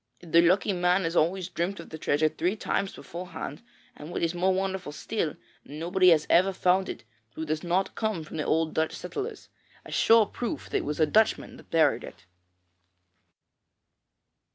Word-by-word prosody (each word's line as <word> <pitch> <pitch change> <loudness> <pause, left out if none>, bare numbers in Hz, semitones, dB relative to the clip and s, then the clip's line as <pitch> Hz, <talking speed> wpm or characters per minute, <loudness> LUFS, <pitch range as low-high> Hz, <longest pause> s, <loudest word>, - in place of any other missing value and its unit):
The 170 0 +4
lucky 185 +4 +3
man 180 +1 +2
has 165 0 -2
always 175 +3 +1
dreamt 180 +1 -3
of 170 - -10
the 160 - -6
treasure 150 +1 +2
three 175 +5 -1
times 200 -2 -1
beforehand, 170 -4 -7 0.3
and, 150 - -10
what 175 - -3
is 165 0 +1
more 180 +2 +2
wonderful 190 -3 -2
still, 165 0 -3 0.3
nobody 175 +5 +2
has 155 -3 +4
ever 185 +3 +4
found 185 +1 +2
it - - -6 0.3
who 160 - -4
does 155 0 -2
not 180 +2 0
come 215 -7 -2
from 155 - -8
the 155 - -1
old 160 +1 +1
Dutch 160 0 0
settlers 425 +2 -6 0.4
a - - -10
sure 225 -1 +5
proof 240 +3 -5
that - - +2
it - - -3
was 150 +2 -3
a 155 - +5
Dutchman 215 +9 +1
that - - -17
buried 160 -4 +3
it.' - - -12
175 Hz, 175 wpm, -27 LUFS, 160-190 Hz, 0.4 s, sure